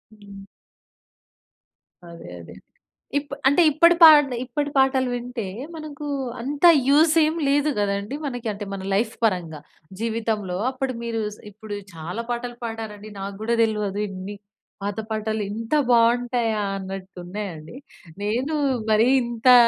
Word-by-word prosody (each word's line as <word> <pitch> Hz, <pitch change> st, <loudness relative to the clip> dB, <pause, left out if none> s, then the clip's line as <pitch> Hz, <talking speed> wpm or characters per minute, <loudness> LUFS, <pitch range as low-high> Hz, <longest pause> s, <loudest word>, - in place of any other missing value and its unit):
హ్మ్. 200 Hz, -1 st, -13 dB, 1.6 s
అదే 170 Hz, -, -11 dB
అదే. -, -, -12 dB, 0.7 s
ఇప్ 285 Hz, -1 st, -8 dB, 0.2 s
అంటే, 285 Hz, +6 st, +4 dB
ఇప్పడి 335 Hz, +4 st, +5 dB
పాటలె 295 Hz, -6 st, +8 dB
ఇప్పటి 290 Hz, +3 st, -2 dB
పాటలు 265 Hz, -1 st, +3 dB
వింటే, 245 Hz, -1 st, -4 dB, 0.3 s
మనకూ 300 Hz, -1 st, -7 dB, 0.3 s
అంత 280 Hz, +6 st, -4 dB, 0.2 s
యూసేం 310 Hz, +2 st, +4 dB
లేదు 290 Hz, +2 st, +2 dB
గదండి 200 Hz, +5 st, -1 dB
మనకి. 245 Hz, -4 st, -5 dB
అంటే, 205 Hz, +1 st, -6 dB
మన 195 Hz, -, -6 dB
లైఫ్ 215 Hz, +5 st, 0 dB
పరంగా. 175 Hz, -7 st, 0 dB, 0.4 s
జీవితంలో 220 Hz, -5 st, -2 dB
అప్పుడు 265 Hz, 0 st, -3 dB
మీరూ 230 Hz, -1 st, -2 dB
స్ -, -, -23 dB
ఇప్పుడు 210 Hz, +1 st, -8 dB, 0.2 s
చాలా 170 Hz, +8 st, -5 dB
పాటలు 240 Hz, 0 st, -3 dB
పాడారండి. 220 Hz, -2 st, -6 dB
నాగ్గూడా 200 Hz, +4 st, -2 dB
దెల్వదు 210 Hz, -2 st, -1 dB
ఇన్ని. 195 Hz, +2 st, -7 dB, 0.5 s
పాత 205 Hz, +2 st, -3 dB
పాటలు 220 Hz, 0 st, -2 dB
ఇంత 225 Hz, +3 st, -6 dB, 0.2 s
బావుంటయా 235 Hz, -1 st, +2 dB, 0.2 s
అన్నట్టున్నయండి. 190 Hz, -1 st, -7 dB, 0.5 s
నేనూ 245 Hz, +9 st, -1 dB, 0.4 s
మరీ 220 Hz, +3 st, +4 dB, 0.2 s
ఇంతా 240 Hz, +1 st, +4 dB
225 Hz, 120 wpm, -23 LUFS, 200-260 Hz, 1.6 s, పాటలె